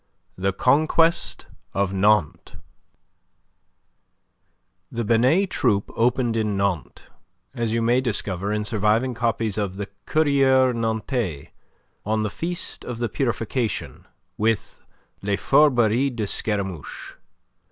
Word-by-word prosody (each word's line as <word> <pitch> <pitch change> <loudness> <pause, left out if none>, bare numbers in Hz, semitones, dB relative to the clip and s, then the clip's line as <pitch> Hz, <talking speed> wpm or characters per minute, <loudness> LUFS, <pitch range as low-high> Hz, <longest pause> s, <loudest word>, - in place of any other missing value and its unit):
THE 95 +1 0
CONQUEST 155 - +2 0.3
OF 100 -1 0
NANTES 95 -4 +1 2.4
The 120 0 -3
Binet 130 - +3
Troupe 105 -5 0
opened 120 0 +1
in 105 -3 0
Nantes 95 -9 -2 0.5
as 115 -2 -2
you 115 0 0
may 120 +2 +3
discover 100 -5 -1
in 105 0 -1
surviving 110 +4 +1
copies 115 -3 -1
of 100 -2 -2
the 100 0 -5 0.2
"Courrier 135 -4 +3
Nantais" 110 - -2 0.5
on 110 +1 0
the 105 - -2
Feast 175 - -2
of 120 - -6
the 120 -1 -2
Purification 120 - -3 0.3
with 110 -1 -1 0.4
"Les 100 0 0
Fourberies 125 -2 +3
de 110 -3 -2
Scaramouche." 95 -6 -2
115 Hz, 110 wpm, -23 LUFS, 100-125 Hz, 2.4 s, Binet